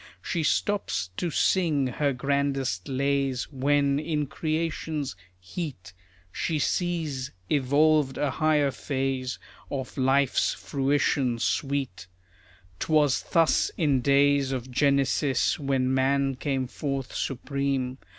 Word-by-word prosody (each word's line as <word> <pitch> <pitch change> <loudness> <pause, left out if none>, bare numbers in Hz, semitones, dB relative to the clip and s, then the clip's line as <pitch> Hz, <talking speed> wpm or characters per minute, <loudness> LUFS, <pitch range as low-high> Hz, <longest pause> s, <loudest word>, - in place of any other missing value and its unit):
She 170 - -1
stops 125 - 0
to 175 - -1
sing 160 -4 +2
her 140 +3 0
grandest 135 -7 -1
lays 135 -1 -1
When, 140 +1 +2
in 150 -1 -1
creation's 155 - -3 0.2
heat, 95 - -7 0.4
She 160 - -1
sees 155 -5 -1 0.2
evolved 145 0 +3
a 145 -2 0
higher 150 -1 +2
phase 130 -2 -2 0.3
Of 135 0 -5
life's 135 0 +2
fruition 135 -3 0
sweet. 135 -7 -2 0.7
'Twas 150 -4 +2
thus 165 -3 +3
in 145 -6 +2
days 140 0 +3
of 130 -1 -4
Genesis, 140 +1 +2
When 135 -2 0
man 135 +1 +2
came 135 -1 -1
forth 135 0 -4
supreme. 135 -1 -2
140 Hz, 105 wpm, -26 LUFS, 130-150 Hz, 0.7 s, evolved